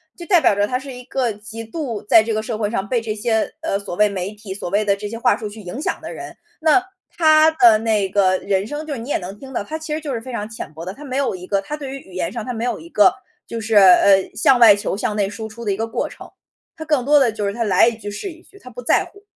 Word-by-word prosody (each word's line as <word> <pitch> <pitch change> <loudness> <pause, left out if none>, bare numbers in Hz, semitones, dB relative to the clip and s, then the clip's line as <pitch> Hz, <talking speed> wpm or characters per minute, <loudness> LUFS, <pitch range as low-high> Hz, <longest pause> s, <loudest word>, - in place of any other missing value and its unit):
就 345 - -10
代 360 -4 +5
表 310 - +4
着 205 +1 +1
他 250 - -1
是 265 +1 -8
一 250 0 -10
个 260 -3 -1
极 220 +2 -9
度 235 -3 -5
在 220 - +6
这 225 +1 -3
个 215 - -1
社 225 0 -3
会 210 -1 -1
上 200 -3 -2
被 240 +2 0
这 220 -2 -4
些， 220 0 0
呃， 200 -11 -1
所 200 -3 -7
谓 210 +3 +4
媒 195 -1 -4
体， 210 -2 -8
所 195 -2 -6
谓 205 +3 +1
的 200 -1 +2
这 205 +1 -6
些 230 - -6
话 230 - +3
术 215 -4 -6
去 215 +2 -11
影 205 +7 -7
响 - - -2
的 - - -8
人。 - - -9 0.2
那 320 +4 +4 0.3
他 310 -1 +6
的 240 -9 +5
那 215 -3 +1
个 190 -1 +2
人 195 +1 -1
生 295 +5 -5
就 305 - -4
是 265 - -5
你 235 +4 -8
也 - - +1
能 190 +1 -7
听 270 -1 -11
到， 210 - -2
他 310 - -6
其 315 -1 -8
实 305 - -1
就 295 -3 -5
是 230 - -3
非 255 - -9
常 210 -3 -4
浅 220 -6 -8
薄 160 +2 -9
的， 185 - -5
他 290 - -12
没 265 -2 -4
有 275 -7 0
一 180 0 -10
个 200 0 +1
他 295 +9 -5
对 285 -3 -7
于 270 - -6
语 190 - -17
言 180 -2 -2
上 230 -3 -5
他 250 - -4
没 225 0 -4
有 245 - -2
一 330 - -12
个， 210 - +4 0.3
就 230 - -5
是， 220 0 -2
呃， 195 0 +6
向 265 -2 +4
外 225 -4 +8
求， 200 - -3
向 210 +1 -2
内 205 -2 +1
输 220 +2 -6
出 230 +2 -10
的 205 - 0
一 - - 0
个 225 +3 -3
过 225 - -2
程， - - -12 0.5
他 315 - -7
更 300 -5 +1
多 295 +3 +4
的 265 -5 +4
就 210 -2 -3
是 - - -1
他 235 - -1
来 200 0 +4
一 235 -2 -1
句 205 -2 -7
是 295 - -5
一 335 +1 -16
句， 400 - -19
他 255 - -12
不 245 0 -9
在 - - +3
乎。 400 - -16
225 Hz, 335 characters per minute, -20 LUFS, 205-265 Hz, 0.5 s, 外